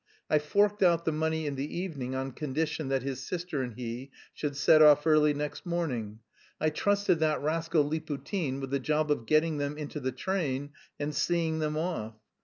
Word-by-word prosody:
"I 155 Hz, -, +5 dB
forked 205 Hz, +7 st, +2 dB
out 170 Hz, -2 st, +4 dB
the 160 Hz, -, +2 dB
money 160 Hz, 0 st, -1 dB
in 145 Hz, -, -1 dB
the 140 Hz, +4 st, -4 dB
evening 145 Hz, -8 st, -4 dB
on 135 Hz, 0 st, -2 dB
condition 155 Hz, +2 st, -2 dB
that 135 Hz, -2 st, 0 dB
his 135 Hz, -1 st, -4 dB
sister 175 Hz, -4 st, -3 dB
and 125 Hz, -3 st, -4 dB
he 125 Hz, +2 st, -5 dB, 0.2 s
should 145 Hz, -2 st, -3 dB
set 155 Hz, +2 st, +6 dB
off 150 Hz, -1 st, +7 dB
early 155 Hz, -1 st, +5 dB
next 145 Hz, 0 st, -4 dB
morning; 125 Hz, -, -3 dB, 0.4 s
I 155 Hz, 0 st, +1 dB
trusted 200 Hz, +1 st, +2 dB
that 155 Hz, -1 st, +2 dB
rascal 160 Hz, -1 st, +1 dB
Liputin 155 Hz, -1 st, -3 dB
with 135 Hz, -1 st, -5 dB
the 140 Hz, -, +1 dB
job 150 Hz, +2 st, 0 dB
of 115 Hz, -6 st, -1 dB
getting 155 Hz, +1 st, +2 dB
them 145 Hz, +1 st, -2 dB
into 150 Hz, 0 st, -5 dB
the 130 Hz, -1 st, -2 dB
train 145 Hz, -6 st, -2 dB, 0.3 s
and 150 Hz, +1 st, -2 dB
seeing 165 Hz, +1 st, 0 dB
them 155 Hz, -1 st, -1 dB
off. 155 Hz, -10 st, -3 dB
150 Hz, 190 wpm, -29 LUFS, 135-160 Hz, 0.4 s, off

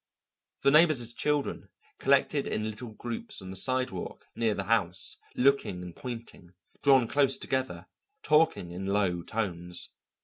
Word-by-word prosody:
The 140 Hz, -, +5 dB
neighbours' 150 Hz, -7 st, +5 dB
children 145 Hz, +3 st, -1 dB, 0.3 s
collected 140 Hz, +1 st, +2 dB
in 110 Hz, 0 st, -1 dB
little 115 Hz, +3 st, -8 dB
groups 120 Hz, -, -5 dB
on 95 Hz, 0 st, -6 dB
the -, -, -7 dB
sidewalk 130 Hz, -3 st, -1 dB
near 110 Hz, -2 st, +1 dB
the 100 Hz, -, -2 dB
house, 95 Hz, -4 st, 0 dB, 0.2 s
looking 125 Hz, -9 st, +2 dB
and 90 Hz, -1 st, -9 dB
pointing, 115 Hz, -8 st, -8 dB, 0.3 s
drawn 135 Hz, -4 st, +5 dB
close 135 Hz, 0 st, +3 dB
together, 130 Hz, -10 st, -2 dB, 0.4 s
talking 155 Hz, -, +3 dB
in 95 Hz, +2 st, -5 dB
low 100 Hz, -3 st, +1 dB
tones. 90 Hz, -3 st, -3 dB
115 Hz, 135 wpm, -29 LUFS, 95-135 Hz, 0.4 s, The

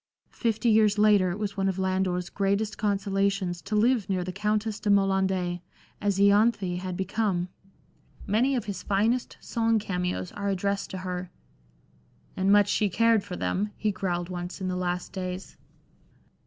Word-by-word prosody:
Fifty 230 Hz, 0 st, -1 dB
years 215 Hz, -2 st, +4 dB
later 205 Hz, -3 st, +5 dB
it 175 Hz, -, -3 dB
was 210 Hz, -2 st, -3 dB
one 195 Hz, -1 st, +1 dB
of 190 Hz, -, -3 dB
Lander's 185 Hz, -1 st, -1 dB
greatest 200 Hz, +2 st, 0 dB
consolations 195 Hz, -3 st, 0 dB
to 215 Hz, -, -3 dB
live 225 Hz, -1 st, +2 dB
near 185 Hz, -2 st, 0 dB
the 185 Hz, -, -4 dB
Countess 210 Hz, +2 st, -1 dB
de 210 Hz, -, -2 dB
Moland^, 190 Hz, -3 st, +2 dB, 0.4 s
as 200 Hz, -2 st, +1 dB
lanthe 200 Hz, -2 st, +3 dB
had 185 Hz, -1 st, -5 dB
become. 190 Hz, -2 st, -1 dB, 0.8 s
Many 245 Hz, +7 st, +2 dB
of 240 Hz, -, -2 dB
his 195 Hz, -4 st, -5 dB
finest 220 Hz, +6 st, 0 dB
song 225 Hz, -1 st, +1 dB
cameos 180 Hz, -3 st, -2 dB
are 200 Hz, 0 st, -3 dB
addressed 200 Hz, +1 st, -1 dB
to 190 Hz, -, -5 dB
her 180 Hz, 0 st, -4 dB, 0.6 s
(" 60 Hz, 0 st, -35 dB
And 190 Hz, +1 st, +2 dB
much 205 Hz, -1 st, +5 dB
she 210 Hz, -, +2 dB
cared 230 Hz, +1 st, +3 dB
for 180 Hz, -, -6 dB
them! 205 Hz, +4 st, -2 dB
" -, -, -32 dB
he 215 Hz, -, 0 dB
growled 175 Hz, -2 st, -2 dB
once 175 Hz, +1 st, -5 dB
in 185 Hz, -1 st, -2 dB
the 180 Hz, -, -2 dB
last 180 Hz, 0 st, -3 dB
days). 185 Hz, 0 st, -5 dB
195 Hz, 170 wpm, -27 LUFS, 185-210 Hz, 0.8 s, later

